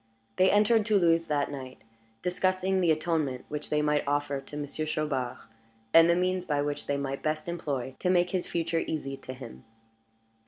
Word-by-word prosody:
They 185 Hz, +1 st, +5 dB
entered 210 Hz, +2 st, +4 dB
Toulouse 170 Hz, -6 st, +3 dB
that 145 Hz, -1 st, 0 dB
night, 130 Hz, -2 st, -7 dB, 0.5 s
discussing 185 Hz, +1 st, +1 dB
the 175 Hz, -, +3 dB
atonement 155 Hz, -5 st, 0 dB
which 150 Hz, 0 st, -5 dB
they 150 Hz, 0 st, +1 dB
might 150 Hz, 0 st, +2 dB
offer 145 Hz, -1 st, 0 dB
to 145 Hz, +2 st, -9 dB
Monsieur 150 Hz, +1 st, -3 dB
Chaubard, 140 Hz, -5 st, -2 dB, 0.6 s
and 165 Hz, +1 st, +8 dB
the 170 Hz, -, +5 dB
means 185 Hz, 0 st, 0 dB
which 145 Hz, 0 st, -1 dB
they 140 Hz, -, 0 dB
might 135 Hz, -1 st, -3 dB
best 155 Hz, +1 st, -2 dB
employ 140 Hz, -7 st, -3 dB
to 180 Hz, -, 0 dB
make 180 Hz, -1 st, +3 dB
his 185 Hz, -2 st, -1 dB
future 165 Hz, -1 st, -1 dB
easy 140 Hz, -4 st, -3 dB
to 130 Hz, -, -8 dB
him. 120 Hz, -, -10 dB
155 Hz, 170 wpm, -28 LUFS, 140-175 Hz, 0.6 s, and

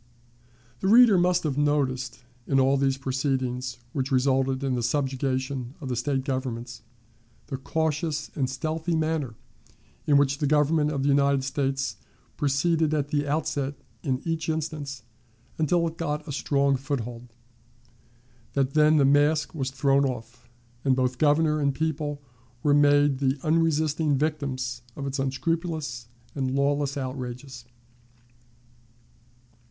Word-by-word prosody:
The -, -, -1 dB
reader 230 Hz, 0 st, +7 dB
must 180 Hz, 0 st, +3 dB
have 145 Hz, -3 st, -1 dB
noticed, 130 Hz, -4 st, 0 dB, 0.2 s
in 135 Hz, -, +3 dB
all 135 Hz, +1 st, +4 dB
these 135 Hz, -1 st, +1 dB
proceedings 130 Hz, -2 st, -2 dB, 0.2 s
which 135 Hz, 0 st, -2 dB
resulted 130 Hz, 0 st, +2 dB
in 135 Hz, -2 st, 0 dB
the 125 Hz, -, -1 dB
subjugation 130 Hz, 0 st, -1 dB
of 135 Hz, -, -6 dB
the 125 Hz, -, -1 dB
State 135 Hz, +2 st, -1 dB
governments, 125 Hz, -3 st, -4 dB, 0.6 s
the 135 Hz, -, -5 dB
cautious 155 Hz, +1 st, -2 dB
and 130 Hz, -3 st, -1 dB
stealthy 160 Hz, +5 st, -2 dB
manner 155 Hz, -6 st, -1 dB, 0.7 s
in 145 Hz, -2 st, +5 dB
which 140 Hz, 0 st, +2 dB
the 145 Hz, -, +1 dB
Government 150 Hz, +1 st, +3 dB
of 140 Hz, -3 st, -2 dB
the 140 Hz, -, +2 dB
United 140 Hz, -1 st, +3 dB
States 135 Hz, 0 st, -1 dB, 0.4 s
proceeded 155 Hz, +2 st, +1 dB
at 145 Hz, -1 st, -1 dB
the 145 Hz, -1 st, 0 dB
outset 145 Hz, -2 st, -1 dB, 0.3 s
in 130 Hz, -1 st, -2 dB
each 165 Hz, -1 st, -2 dB
instance 150 Hz, -4 st, -3 dB, 0.6 s
until 170 Hz, +2 st, +2 dB
it 165 Hz, 0 st, -7 dB
got 150 Hz, -2 st, -3 dB
a -, -, -4 dB
strong 140 Hz, 0 st, +1 dB
foothold, 125 Hz, -3 st, -5 dB, 1.2 s
that 135 Hz, -1 st, 0 dB
then 155 Hz, 0 st, +5 dB
the 140 Hz, -, +5 dB
mask 145 Hz, +2 st, +3 dB
was 135 Hz, -5 st, -2 dB
thrown 135 Hz, +1 st, +2 dB
off, 120 Hz, -2 st, -5 dB, 0.3 s
and 135 Hz, -2 st, +3 dB
both 125 Hz, -1 st, 0 dB
Governor 155 Hz, +1 st, +3 dB
and 140 Hz, -2 st, +1 dB
people 150 Hz, -2 st, -2 dB, 0.4 s
were 145 Hz, -, +4 dB
made 145 Hz, -1 st, +4 dB
the 135 Hz, 0 st, +1 dB
unresisting 155 Hz, -2 st, +2 dB
victims 130 Hz, -5 st, -2 dB
of 140 Hz, -, -5 dB
its 135 Hz, 0 st, -3 dB
unscrupulous 150 Hz, -2 st, -2 dB, 0.3 s
and 130 Hz, -2 st, -2 dB
lawless 140 Hz, 0 st, +1 dB
outrages. 130 Hz, -1 st, -6 dB
140 Hz, 135 wpm, -26 LUFS, 130-150 Hz, 1.2 s, reader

